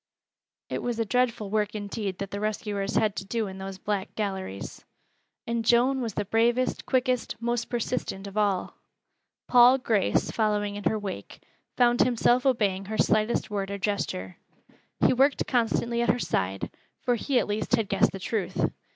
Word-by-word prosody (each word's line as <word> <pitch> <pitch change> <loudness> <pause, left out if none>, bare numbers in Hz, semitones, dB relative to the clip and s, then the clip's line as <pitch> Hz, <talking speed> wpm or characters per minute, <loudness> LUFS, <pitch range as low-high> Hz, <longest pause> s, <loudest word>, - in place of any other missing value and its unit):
It - - -3
was 240 -2 -2
a 225 - 0
dreadful 235 -3 0
work 210 -1 0
indeed 205 -2 -4
that 195 -1 -5
the 200 - -3
rescuers 205 -1 -2
had 215 -2 +2
to - - -3
do 225 +2 -1
in 190 -1 -7
those 190 0 -6
black 200 0 -3
galleries. 190 - -4 0.6
And 235 0 -1
Joan 250 +4 +3
was 225 -4 -3
the 205 - -1
bravest, 235 +4 +1
quickest, 255 -2 +1
most 235 0 -1
persistent 235 -4 -3
of 200 0 -9
all. 205 -3 0 0.7
Paul 250 +1 +7
Grace, 220 -6 +1
following 210 -2 0
in 205 - -7
her 220 - +2
wake, 200 -3 -7 0.4
found 240 -1 +4
himself 245 +2 +3
obeying 200 -6 +1
her 215 +2 -4
slightest 215 +1 +1
word 200 -1 -2
or 200 - -3
gesture. 190 - -3 0.7
He - - +5
worked 270 +3 +3
constantly 235 0 +1
at 235 - +1
her - - +3
side, 95 - -2 0.3
for 245 - +2
he 255 +3 0
at - - +3
least 210 +3 0
had 225 -3 -1
guessed 195 - +2
the 195 - -6
truth. 195 0 -1
215 Hz, 170 wpm, -27 LUFS, 200-240 Hz, 0.7 s, Paul